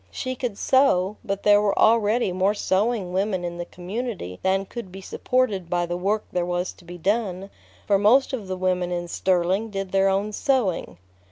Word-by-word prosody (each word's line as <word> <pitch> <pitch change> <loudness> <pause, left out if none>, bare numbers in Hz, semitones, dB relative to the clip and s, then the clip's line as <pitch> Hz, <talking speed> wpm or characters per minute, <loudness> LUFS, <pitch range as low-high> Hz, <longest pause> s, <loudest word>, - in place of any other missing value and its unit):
She 255 -1 -4
could 245 -5 -4
sew, 215 -8 +3
but 200 -3 -3
there 205 0 +6
were 205 -1 +1
already 225 -1 +3
more 190 +3 +1
sewing 200 -1 0
women 190 -1 0
in 175 0 -5
the 175 - -3
community 180 - -5
than 190 +1 +1
could 200 -2 -8
be 190 - -9
supported 200 -2 -1
by 175 0 +1
the 175 0 -3
work 200 +4 0
there 180 - 0
was 175 +1 -2
to 175 - -20
be 175 +1 -9
done, 195 0 -1 0.3
for 200 -2 +3
most 245 +7 +4
of 220 -7 -4
the 185 0 -3
women 180 -1 0
in 175 0 -3
Sterling 185 +5 0
did 195 -2 -4
their 195 0 +3
own 200 +2 0
sewing. 215 - 0
195 Hz, 190 wpm, -24 LUFS, 180-215 Hz, 0.3 s, there